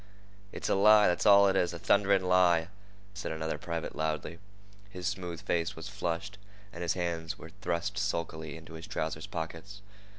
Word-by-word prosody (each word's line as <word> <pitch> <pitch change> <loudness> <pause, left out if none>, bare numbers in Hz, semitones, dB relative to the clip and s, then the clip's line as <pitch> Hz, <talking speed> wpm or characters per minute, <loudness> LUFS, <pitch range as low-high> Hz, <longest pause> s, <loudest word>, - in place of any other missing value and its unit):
"It's - - -4
a - - +2
lie! 105 +1 +6
that's 90 +4 +1
all 100 -1 +8
it 95 - +2
is—a 85 -2 +1
thunderin' 100 +2 +3
lie!" 90 -2 +4 0.4
said 95 - -5
another 80 0 -3
private 85 -1 -4
loudly. 80 +2 -2 0.5
His 90 -3 -7
smooth 90 -3 -3
face 85 +2 -1
was 80 +4 -7
flushed, 95 0 -4 0.3
and 85 - -8
his 85 - +1
hands 85 -3 -3
were 80 - -11
thrust 90 +2 -2
sulkily 80 -6 -3
into 80 0 -12
his 80 +3 -8
trouser's 80 -5 -3
pockets. 85 +5 -6
85 Hz, 165 wpm, -30 LUFS, 80-95 Hz, 0.5 s, all